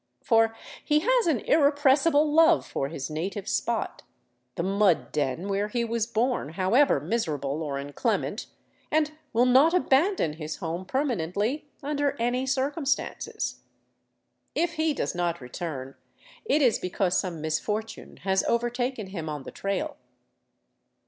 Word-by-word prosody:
For 225 Hz, -1 st, +3 dB, 0.3 s
he 300 Hz, 0 st, +2 dB
has -, -, +2 dB
an 290 Hz, -9 st, +2 dB
irrepressible 290 Hz, 0 st, +4 dB
love 325 Hz, +1 st, +5 dB
for 135 Hz, -, -2 dB
his 140 Hz, -2 st, -5 dB
native 190 Hz, +6 st, -4 dB
spot, 235 Hz, -3 st, -1 dB, 0.5 s
the 170 Hz, -, -2 dB
mud 195 Hz, -2 st, +2 dB
den 150 Hz, +5 st, -1 dB
where 200 Hz, +1 st, 0 dB
he 235 Hz, +2 st, -1 dB
was 230 Hz, -1 st, -1 dB
born, 235 Hz, -, -1 dB
however 210 Hz, +11 st, +3 dB
miserable 155 Hz, -, -2 dB
or 145 Hz, -3 st, -3 dB
inclement, 140 Hz, +1 st, -2 dB, 0.4 s
and 305 Hz, -1 st, +2 dB, 0.2 s
will 235 Hz, +2 st, +3 dB
not 270 Hz, +7 st, +5 dB
abandon 320 Hz, -, +2 dB
his 155 Hz, 0 st, -5 dB
home 170 Hz, +2 st, -4 dB
permanently 240 Hz, -, -1 dB
under 290 Hz, 0 st, 0 dB
any 245 Hz, +3 st, 0 dB
circumstances. 275 Hz, +2 st, -1 dB, 1.0 s
If 340 Hz, +1 st, +1 dB
he 315 Hz, -2 st, 0 dB
does -, -, -2 dB
not 175 Hz, -1 st, -1 dB
return, 135 Hz, 0 st, -6 dB, 0.5 s
it 300 Hz, -8 st, +3 dB
is 245 Hz, -4 st, +3 dB
because 185 Hz, 0 st, 0 dB
some 180 Hz, -4 st, -4 dB
misfortune 210 Hz, +8 st, -3 dB
has 190 Hz, -1 st, +2 dB
overtaken 240 Hz, 0 st, -1 dB
him 175 Hz, -5 st, -6 dB
on 150 Hz, -2 st, -5 dB
the -, -, -8 dB
trail. 195 Hz, -1 st, -3 dB
225 Hz, 135 wpm, -27 LUFS, 170-280 Hz, 1.0 s, love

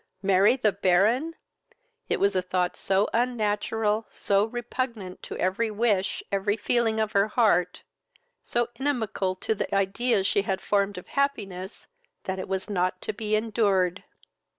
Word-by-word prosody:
Marry 195 Hz, +4 st, +4 dB
the 220 Hz, -5 st, +2 dB
Baron! 205 Hz, -, +2 dB, 0.7 s
it -, -, 0 dB
was 200 Hz, 0 st, +2 dB
a 185 Hz, -, +2 dB
thought 180 Hz, 0 st, -1 dB
so 195 Hz, +2 st, +1 dB
unnatural, 225 Hz, -2 st, 0 dB
so 200 Hz, +1 st, +1 dB
repugnant 230 Hz, -4 st, -4 dB
to -, -, -7 dB
every 195 Hz, +5 st, 0 dB
wish, 210 Hz, -3 st, 0 dB
every 200 Hz, +2 st, 0 dB
feeling 225 Hz, 0 st, +1 dB
of 215 Hz, -1 st, 0 dB
her 200 Hz, +1 st, +3 dB
heart, 205 Hz, -6 st, +2 dB, 0.6 s
so 240 Hz, 0 st, -1 dB
inimical 220 Hz, -9 st, -1 dB
to 205 Hz, -, -1 dB
the 200 Hz, -, -3 dB
ideas 195 Hz, +2 st, +1 dB
she 200 Hz, -, +2 dB
had 195 Hz, -1 st, -2 dB
formed 200 Hz, -1 st, 0 dB
of 180 Hz, -, -8 dB
happiness, 200 Hz, -9 st, -2 dB, 0.4 s
that 190 Hz, 0 st, -3 dB
it -, -, -5 dB
was 190 Hz, 0 st, -2 dB
not 185 Hz, -2 st, -1 dB
to 215 Hz, -, -3 dB
be 215 Hz, 0 st, -1 dB
endured. 205 Hz, -4 st, +1 dB
205 Hz, 150 wpm, -26 LUFS, 190-225 Hz, 0.7 s, Marry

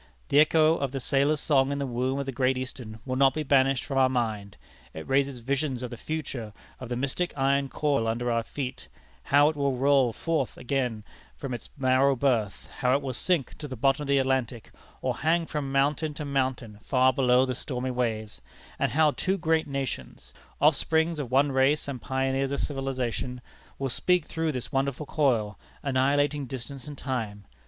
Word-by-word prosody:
The 145 Hz, -, +5 dB
echo 155 Hz, +1 st, +5 dB
of 140 Hz, -2 st, -2 dB
the 135 Hz, -, -3 dB
sailors' 140 Hz, +3 st, +2 dB
song 135 Hz, -2 st, +3 dB
in 140 Hz, -, -1 dB
the 140 Hz, -, -1 dB
womb 130 Hz, +1 st, -1 dB
of 140 Hz, -, -2 dB
the 135 Hz, -, -3 dB
Great 130 Hz, 0 st, +1 dB
Eastern 125 Hz, -4 st, -6 dB
will 130 Hz, -1 st, -2 dB
not 135 Hz, -1 st, +4 dB
be 155 Hz, -, -1 dB
banished 135 Hz, -2 st, +3 dB
from 135 Hz, -1 st, -1 dB
our 130 Hz, -1 st, +5 dB
mind. 110 Hz, -5 st, -2 dB, 0.4 s
It 80 Hz, -, -7 dB
raises 135 Hz, 0 st, +1 dB
visions 130 Hz, +1 st, -2 dB
of 125 Hz, -, -5 dB
the -, -, -5 dB
future 130 Hz, -6 st, -5 dB, 0.3 s
of 125 Hz, -, -8 dB
the 120 Hz, -, -2 dB
mystic 140 Hz, +8 st, -1 dB
iron 140 Hz, 0 st, +2 dB
coil 140 Hz, -7 st, 0 dB
under 120 Hz, +2 st, -1 dB
our 115 Hz, 0 st, +1 dB
feet 130 Hz, +2 st, -6 dB, 0.4 s
how 145 Hz, +1 st, +5 dB
it 155 Hz, -, -4 dB
will 140 Hz, -3 st, 0 dB
roll 135 Hz, -2 st, +4 dB
forth 155 Hz, +3 st, -2 dB
again 125 Hz, -4 st, -2 dB, 0.3 s
from 135 Hz, -3 st, -5 dB
its 120 Hz, -, -6 dB
narrow 135 Hz, +1 st, +3 dB
berth; 120 Hz, -6 st, 0 dB
how 125 Hz, 0 st, +3 dB
it 140 Hz, -, -1 dB
will 130 Hz, -2 st, -3 dB
sink 160 Hz, +2 st, 0 dB
to 150 Hz, -, -6 dB
the 130 Hz, -, -6 dB
bottom 135 Hz, +4 st, +2 dB
of 145 Hz, -, -4 dB
the 140 Hz, 0 st, +3 dB
Atlantic, 130 Hz, -3 st, -1 dB, 0.3 s
or -, -, -1 dB
hang 165 Hz, +2 st, +1 dB
from 150 Hz, -4 st, -4 dB
mountain 145 Hz, +2 st, +1 dB
to 150 Hz, -, -5 dB
mountain 130 Hz, -6 st, -2 dB
far 130 Hz, 0 st, +3 dB
below 125 Hz, 0 st, +4 dB
the 130 Hz, -, -2 dB
stormy 130 Hz, 0 st, -3 dB
waves; 110 Hz, -, -2 dB, 0.4 s
and -, -, 0 dB
how 155 Hz, 0 st, +4 dB
two 190 Hz, +6 st, -1 dB
great 160 Hz, -2 st, +1 dB
nations, 140 Hz, -2 st, -5 dB, 0.3 s
offsprings 160 Hz, 0 st, +2 dB
of 135 Hz, -5 st, -4 dB
one 140 Hz, +3 st, +3 dB
race 135 Hz, +3 st, +2 dB
and 130 Hz, -4 st, -5 dB
pioneers 135 Hz, 0 st, -1 dB
of 140 Hz, -, -2 dB
civilization, 130 Hz, -3 st, -3 dB, 0.4 s
will 135 Hz, -, -2 dB
speak 180 Hz, +6 st, +1 dB
through 160 Hz, -1 st, -2 dB
this 125 Hz, -1 st, -5 dB
wonderful 135 Hz, +1 st, -1 dB
coil, 120 Hz, -10 st, 0 dB, 0.2 s
annihilating 140 Hz, +1 st, +1 dB
distance 130 Hz, +2 st, -7 dB
and 145 Hz, -1 st, -8 dB
time. 110 Hz, -7 st, -4 dB
135 Hz, 190 wpm, -27 LUFS, 125-145 Hz, 0.4 s, The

